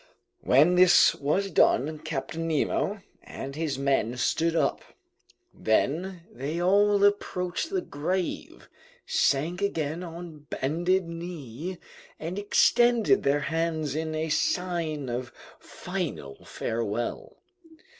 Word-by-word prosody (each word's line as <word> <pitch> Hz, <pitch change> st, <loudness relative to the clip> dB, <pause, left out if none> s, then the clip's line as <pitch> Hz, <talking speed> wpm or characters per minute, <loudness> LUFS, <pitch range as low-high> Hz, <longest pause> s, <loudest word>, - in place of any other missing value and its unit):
When 150 Hz, +7 st, +4 dB
this 180 Hz, -1 st, +7 dB
was 190 Hz, +8 st, -1 dB
done, 155 Hz, +4 st, +3 dB
Captain 160 Hz, +2 st, -4 dB
Nemo 190 Hz, +5 st, 0 dB, 0.2 s
and 135 Hz, +1 st, -8 dB
his 155 Hz, -3 st, -2 dB
men 135 Hz, -4 st, 0 dB
stood 165 Hz, +7 st, +1 dB
up; -, -, +1 dB, 0.7 s
then 170 Hz, -, 0 dB
they 155 Hz, +2 st, -4 dB
all 200 Hz, +3 st, +3 dB
approached 195 Hz, -, 0 dB
the 385 Hz, -2 st, -1 dB
grave, 175 Hz, +5 st, -3 dB, 0.4 s
sank 160 Hz, +7 st, +1 dB
again 165 Hz, -4 st, -1 dB
on 165 Hz, -3 st, -9 dB
bended 175 Hz, +6 st, 0 dB
knee, 165 Hz, -1 st, -6 dB, 0.4 s
and 170 Hz, +5 st, -4 dB
extended 235 Hz, +1 st, +4 dB
their 140 Hz, +1 st, +1 dB
hands 160 Hz, -1 st, -1 dB
in 160 Hz, +1 st, -3 dB
a 160 Hz, +1 st, -2 dB
sign 165 Hz, -3 st, -1 dB
of 125 Hz, +1 st, -4 dB, 0.3 s
final 70 Hz, 0 st, -6 dB
farewell. 115 Hz, 0 st, -3 dB
165 Hz, 105 wpm, -27 LUFS, 145-180 Hz, 0.7 s, this